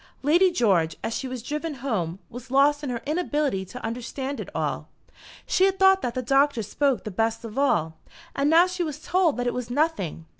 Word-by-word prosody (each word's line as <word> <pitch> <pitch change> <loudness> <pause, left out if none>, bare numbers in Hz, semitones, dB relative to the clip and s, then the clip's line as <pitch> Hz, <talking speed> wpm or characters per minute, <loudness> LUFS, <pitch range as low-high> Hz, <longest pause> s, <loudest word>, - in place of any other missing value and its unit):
Lady 345 +6 +5
George, 195 - +2
as 225 - -2
she 265 - -3
was 255 -3 -6
driven 300 +3 -4
home, 210 -10 -2
was 245 +1 -10
lost 285 +3 +3
in 285 - -3
her 235 -2 -4
inability 295 - -1
to 225 +7 -9
understand 260 +4 -4
it - - -6
all. - - -2 0.6
She 375 - +3
had 385 0 +1
thought 385 0 +5
that 240 - -3
the 255 - -2
Doctor 270 -1 +2
spoke 270 +5 0
the 215 - -5
best 225 +4 -1
of 220 -1 -8
all, 165 - +1 0.4
and 280 +1 +1
now 330 +3 +6
she 360 0 -4
was 305 -4 -2
told 350 -4 +1
that 245 - -2
it 245 - 0
was 250 -2 -4
nothing. 245 - -1
270 Hz, 210 wpm, -25 LUFS, 230-300 Hz, 0.6 s, now